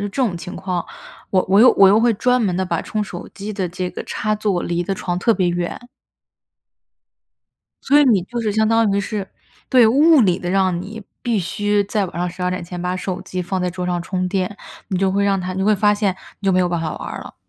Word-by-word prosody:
这 205 +3 -5
种 205 -9 0
情 180 +2 -8
况， 185 -2 -3 0.5
我 185 -1 +2
我 200 +2 +5
又 250 - +8
我 195 - +6
又 205 +3 +5
会 235 0 +3
专 250 +4 +2
门 190 -6 0
地 190 - 0
把 170 -3 -1
充 215 - -2
手 185 -4 -7
机 205 +2 -6
的 190 -3 -2
这 180 +1 -4
个 - - -6
插 215 0 -2
座 205 -4 -1
离 175 0 -1
得 195 +3 -2
床 180 -1 -3
特 230 - +3
别 185 -3 +1
远。 175 0 -3 2.0
所 290 - +4
以 295 - +6
你 215 -8 +3
就 240 +6 -5
是 215 -2 -1
相 220 +1 +2
当 225 -2 +3
于 200 - +1
是， 200 -1 -4 0.4
对， 250 -4 +6
物 295 +6 +5
理 185 -6 +3
地 175 - -4
让 185 -2 +1
你 215 +4 -8 0.2
必 235 -3 0
须 205 +3 0
在 205 0 -1
晚 175 - -12
上 180 +1 -1
12 180 +1 -3
前 175 +1 -7
把 180 +1 -2
手 185 0 -4
机 185 - -5
放 180 +1 -2
在 180 - -1
桌 180 0 -4
上 175 -1 -1
充 185 +1 -2
电， 190 +1 -2 0.3
你 185 - -1
就 190 0 +2
会 200 +1 +1
让 195 -1 +1
它 185 0 -4
你 190 - -2
会 210 +1 +3
发 205 +1 +3
现， 205 -3 0 0.3
你 200 - -5
就 190 - +4
没 185 - +3
有 180 - +1
办 175 -1 -1
法 155 -2 -3
玩 - - -6
儿 - - -6
了。 - - -12
190 Hz, 260 characters per minute, -20 LUFS, 180-210 Hz, 2.0 s, 又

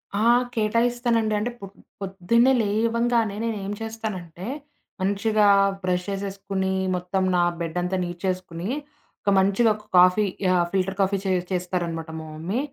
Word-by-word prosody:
ఆ! 215 +2 +1 0.3
కేటాయిస్తానండి. 230 0 +1
అంటే 235 +4 -2
పొద్ 195 0 -9 0.3
పొద్దున్నే 195 +6 +2
లేవంగానే 230 +1 +1
నేనేం 205 -3 -3
చేస్తానంటే, 200 -6 -5 0.5
మంచిగా 205 +2 +2 0.4
బ్రష్ 180 -1 0
చేసేసుకొని, 195 -1 -2 0.2
మొత్తం 180 +1 -1
నా 175 - +4 0.2
బెడ్డంతా 180 +3 -1
నీట్ 175 0 -6
చేసుకొని 185 0 -3 0.5
ఒక - - 0
మంచిగా 200 +4 +3
ఒక 210 0 -15
కాఫీ 180 +4 +6 0.3
ఆహ్, 175 -1 +3
ఫిల్టర్ 195 0 0
కాఫీ 195 +1 +2
చే 190 - 0 0.2
చేస్తారనమాట 175 -3 -2
మా 160 - -8
మమ్మీ. 175 +9 -2
195 Hz, 125 wpm, -24 LUFS, 180-220 Hz, 0.5 s, కాఫీ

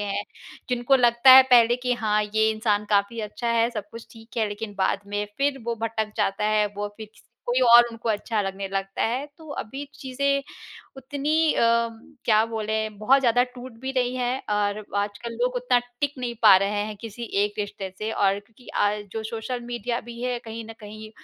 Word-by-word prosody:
हैं। 205 0 -2 0.5
जिनको 250 +2 +3
लगता 240 +1 +5
है 265 - +11
पहले 240 -1 +6
कि 250 0 -1
हाँ 210 -1 +2
ये 220 0 +4
इंसान 215 -1 0
काफ़ी 205 +3 +1
अच्छा 215 +3 -4
है 230 0 +3
सब 210 -4 -6
कुछ 230 0 -10
ठीक 225 +1 -16
है 220 -2 +1
लेक़िन 205 0 -6
बाद 190 +1 +1
में 205 0 -2
फ़िर 280 0 +1
वो 235 - 0
भटक 220 -1 -2
जाता 205 -1 0
है। 215 0 +2
वो 205 0 -3
फ़िर 220 -1 -9
किस - - -21 0.2
कोई 245 +1 +1
और 240 -1 +8
उनको 230 0 -6
अच्छा 215 +1 -1
लगने 195 0 -4
लगता 195 0 -3
है 255 +5 -2
तो 320 -1 -13
अभी 270 +6 -7
चीज़ें 280 0 -1 0.5
उतनी 290 +4 0
अ, - - 0 0.6
क्या 220 -1 +4
बोले 220 -1 -2
बहुत 215 +6 +3
ज़्यादा 245 -1 +3
टूट 250 0 -9
भी 265 - -3
रही 250 -1 0
हैं 250 +1 -1 0.2
और 205 0 -1
आजकल 205 +3 -3
लोग 250 +1 +1
उतना 250 0 +2 0.2
टिक 285 0 0
नहीं 245 -1 -3
पा 210 -4 +9
रहे 200 +2 0
हैं 215 0 -6
किसी 230 0 -8 0.2
एक 205 0 -1
रिश्ते 205 -2 -4
से 215 +1 -3
और 195 0 +2
क्योंकि 225 +3 -21 0.2
आज 210 0 -1
जो 220 - -4
सोशल 230 +3 -4
मीडिया 240 0 -3
भी 235 0 -8
है 250 -1 -1
कहीं 225 0 -7
न - - -6
कहीं 215 +1 -10
225 Hz, 200 wpm, -25 LUFS, 210-245 Hz, 0.6 s, है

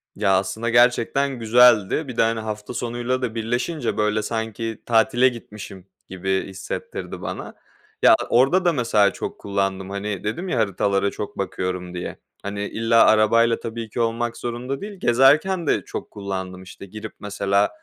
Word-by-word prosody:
Ya, 95 -1 +3
aslında 110 +5 -2
gerçekten 125 +3 +2
güzeldi. 120 +3 +4
Bir 125 -2 -7
de, - - +4
hani, 115 0 +1
hafta 105 0 -5
sonuyla 120 +2 -2
da 120 -3 -3
birleşince 120 +8 -2
böyle, 105 0 +1
sanki 110 0 -4
tatile 120 +2 +4
gitmişim 105 -5 -10 0.2
gibi 95 +1 -2
hissettirdi 95 0 -6
bana. - - -6 0.5
Ya, - - +7
orada 135 +10 +3
da 175 - +4
mesela 110 -7 +2
çok - - -6
kullandım; 95 -1 -2
hani, 100 0 -4
dedim 140 - -3
ya 125 - -1
haritalara 100 -1 +1
çok 105 - -7
bakıyorum 90 -2 -3
diye. 90 0 -6 0.2
Hani, 100 0 -4
illa 115 0 +3
arabayla 115 +2 +4
tabii 115 0 -6
ki 115 - -6
olmak 115 0 -1
zorunda 125 +3 -4
değil. 205 -2 -8
Gezerken 150 +9 +3
de - - +1
çok - - -7
kullandım, 95 -2 -5
işte, 95 +1 -11
girip, 105 +2 -9
mesela, 100 0 +1
110 Hz, 155 wpm, -22 LUFS, 100-120 Hz, 0.5 s, Ya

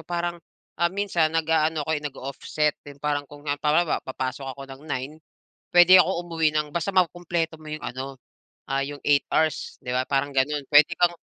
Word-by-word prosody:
parang, 175 +1 -3 0.4
ah, 170 - +4
minsan 185 -4 +1
nag-aano 160 -1 +1
ako, 160 - -4
eh, 150 - 0
nag-o-offset 145 +1 -2
din 145 -1 -12
parang 145 0 -2
kung 145 0 -13
halimbawa, 150 +3 +1
papasok 130 +1 -5
ako 140 - -8
ng 135 - -12
9, 135 +2 -3 0.6
puwede 180 +1 +8
ako 190 -2 -1
umuwi 165 -2 +1
ng 150 -1 0
basta 170 +3 -1
makukumpleto 175 -3 0
mo 155 -1 -11
'yung 155 - -4
ano, 130 +2 -6 0.5
ah, 135 0 0
'yung 145 +1 -6
8 145 -1 +4
hours, 155 -2 0
'di 125 0 -4
ba? 130 - +2
Parang 140 +1 -1
ganun. 140 +1 0
Puwede 150 +2 +6
kang 175 -1 +3
150 Hz, 180 wpm, -25 LUFS, 140-170 Hz, 0.6 s, puwede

